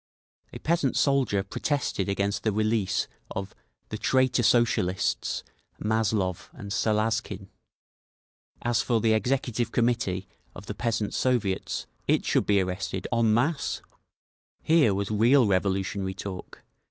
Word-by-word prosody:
A - - -7
peasant 160 -5 0
soldier 130 -8 +2
protested 105 -2 -2
against 100 0 -1
the 110 - +1
release 110 -1 0 0.2
of 95 0 -5 0.4
"the 110 - -5
traitor 130 -1 +2
Socialists, 95 - +1 0.4
Mazlov 105 -4 0
and 100 -1 -9
Salazkin"; 110 -3 -1 1.1
as 120 -2 +2
for 115 -1 +1
the 110 0 +3
Executive 120 0 0
Committee 115 -6 0 0.3
of 90 - -10
the 105 - -5
Peasants' 110 -1 -2
Soviets, 115 -7 0 0.2
it - - +2
should - - +1
be 100 -1 +4
arrested 95 0 -3
_en 115 -1 +3
masse!_Here 140 - -1
was 100 +1 -2
real 120 +5 +5
revolutionary 95 0 0
talk…. 95 -1 -8
110 Hz, 115 wpm, -27 LUFS, 100-120 Hz, 1.1 s, real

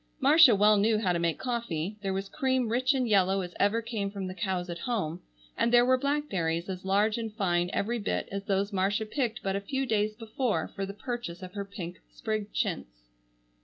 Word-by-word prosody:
Marcia 285 -3 +7
well 210 +1 +5
knew 215 +2 +3
how 190 -5 +1
to 170 - 0
make 170 -1 0
coffee, 215 -7 -3
there 195 -1 -2
was 195 +1 -2
cream 260 -2 0
rich 255 +4 +2
and 255 -2 +1
yellow 195 -2 +3
as 175 -1 -6
ever 220 +3 +2
came 220 -4 -3
from 195 -1 -5
the 185 - -5
cows 185 -2 -2
at 170 -1 -6
home 180 -9 -2 0.3
and 235 - +1
there 240 0 +6
were 255 +1 +5
blackberries 200 - -1
as 185 -1 -5
large 205 +4 +2
and 220 -2 -5
fine 175 -3 +1
every 235 +3 -1
bit 210 - -2
as 200 0 -3
those 200 +1 0
Marcia 200 +3 +1
picked 235 0 -2
but 195 0 -1
a 200 - -1
few 270 +6 -2
days 215 -2 0
before 225 -5 -1
for 195 0 -4
the 200 - -6
purchase 220 -7 -5
of 180 0 -8
her 200 - -3
pink 180 -3 -7 0.2
sprigged 215 -2 -3
chintz. - - -3
205 Hz, 210 wpm, -29 LUFS, 185-235 Hz, 0.3 s, Marcia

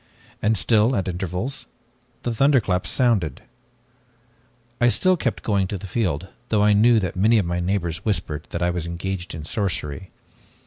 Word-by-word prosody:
And 110 +1 +2
still, 115 +3 +3
at 95 - -1
intervals, 95 +8 -3 0.6
the 120 - -1
thunderclaps 115 -8 +2
sounded. 105 - +1 1.4
"I 120 - +5
still 185 +9 +3
kept 130 -8 -2
going 100 -3 +1
to 100 - -4
the 95 - -9
field, 95 -4 -1 0.2
though 105 -2 +3
I 105 0 +5
knew 115 +3 +5
that 90 -4 -3
many 110 +5 +4
of 100 - +2
my 85 +1 -1
neighbors 85 -2 -2
whispered 80 -8 -1
that 85 - -3
I 90 - +2
was 85 -1 -3
engaged 90 +1 -4
in 75 -2 -7
sorcery. 90 -3 -3
95 Hz, 165 wpm, -23 LUFS, 85-110 Hz, 1.4 s, I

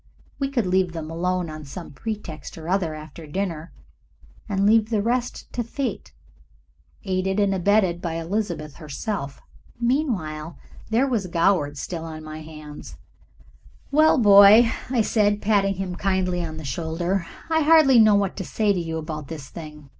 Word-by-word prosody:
We 275 -1 0
could 250 -6 0
leave 185 -1 +1
them 160 -1 -6
alone 180 +1 -1
on 155 -1 -8
some 155 +5 -8
pretext 165 -3 -6
or 160 0 -8
other 175 -4 0
after 155 +1 -10
dinner, 170 -1 -4 0.8
and 200 -1 +1
leave 220 +1 +4
the 220 -3 +1
rest 245 +2 -2
to 240 - -1
fate 255 +3 -4 0.9
aided 190 +1 -1
and 200 -1 +2
abetted 190 -2 +2
by 165 -2 -3
Elizabeth 165 -4 -3
herself. 150 0 -5 0.4
Meanwhile 200 - -1 0.3
there 230 +4 +3
was 230 -8 -1
Goward 165 -4 +1
still 165 +2 -5
on 155 -1 -8
my 155 0 -8
hands. 155 -1 -10 0.9
"Well, 310 +2 +5
my 245 - +2
boy," 205 +3 +8 0.2
I 245 -4 +2
said, 205 -1 +2
patting 200 -2 +2
him 185 -1 -4
kindly 185 -2 0
on 160 -1 -6
the 160 - -7
shoulder, 170 +4 -2 0.2
"I 320 0 +3
hardly 300 -5 +6
know 215 -2 +6
what 200 -2 0
to 195 - -3
say 210 +2 +1
to 185 - -1
you 165 -1 -3
about 155 -2 -6
this 150 -4 -8
thing. 150 -3 -10
185 Hz, 160 wpm, -23 LUFS, 160-215 Hz, 0.9 s, boy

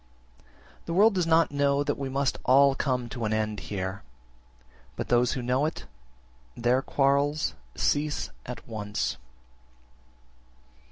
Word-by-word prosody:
6. - - -28 0.4
The 165 - -2
world 210 +3 +6
does 180 -3 0
not 165 -1 +4
know 140 0 +2
that 145 0 -1
we 135 -1 -3
must 135 +1 -1
all 135 +2 +5
come 125 -3 -1
to 120 -2 -5
an 110 0 0
end 110 -1 -1
here; 95 0 -4 0.9
but - - -5
those 120 0 +3
who 130 - -3
know 130 +5 +1
it, 160 - -6 0.7
their 120 +2 +2
quarrels 140 +2 +1 0.2
cease 150 0 0
at 125 - -8
once. 105 - -3
135 Hz, 135 wpm, -27 LUFS, 120-145 Hz, 0.9 s, world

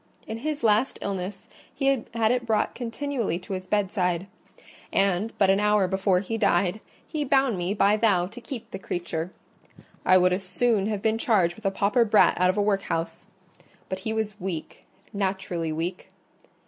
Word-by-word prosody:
In 220 +1 -5
his 300 +2 -3
last 220 +4 +3
illness, 195 0 -4 0.2
he 270 -4 0
had 225 -1 +3
it 250 0 +1
brought 220 -2 +1
continually 245 - -2
to 185 +2 -7
his 185 0 -5
bedside; 185 -3 0 0.7
and 195 +3 +1
but 195 -1 +4
an 195 - +3
hour 210 -2 +3
before 190 -1 +1
he 225 +3 -3
died, 200 -1 +2 0.3
he 305 -2 -2
bound 270 -4 +2
me 180 +3 -2
by 200 +1 +4
vow 200 -6 +3
to 230 +7 -10
keep 235 0 -7
the 195 - -6
creature. 175 -2 -4 0.7
I 185 - +6
would 180 0 +4
as 185 - -1
soon 200 +2 +1
have 210 -2 -3
been 220 0 +1
charged 185 -8 +2
with 220 -2 -4
a - - +4
pauper 200 +5 +2
brat 215 -1 +5
out 180 - +5
of 185 - 0
a 205 - +3
workhouse: 195 -4 -2 0.6
but 190 - -3
he 220 +3 -3
was 215 -2 -3
weak, 175 -4 -5 0.3
naturally 190 -4 -2
weak. 170 +4 -4
200 Hz, 175 wpm, -26 LUFS, 185-225 Hz, 0.7 s, I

